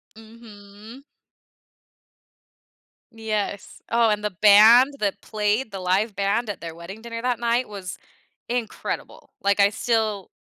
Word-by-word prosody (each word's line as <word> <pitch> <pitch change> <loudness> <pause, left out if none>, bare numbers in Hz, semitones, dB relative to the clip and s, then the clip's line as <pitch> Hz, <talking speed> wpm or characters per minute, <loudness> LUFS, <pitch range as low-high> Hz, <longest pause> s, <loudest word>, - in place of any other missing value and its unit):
Mhm. 220 +1 -14 2.1
Yes, 215 -3 -4
oh, 230 -1 +3
and 210 0 -1
the 210 - -1
band 225 +7 +7
that 200 -1 -2
played, 215 +2 -1
the 195 - -6
live 190 +4 0
band 205 +3 -1
at 205 - -5
their 165 -1 -8
wedding 180 +6 -10
dinner 230 0 -7
that 250 -1 -1
night, 235 0 0
was 190 -3 -7 0.5
incredible, 240 -3 -5
like, 200 +1 +1
I 200 0 +6
still 215 -3 -1
215 Hz, 125 wpm, -23 LUFS, 200-230 Hz, 2.1 s, band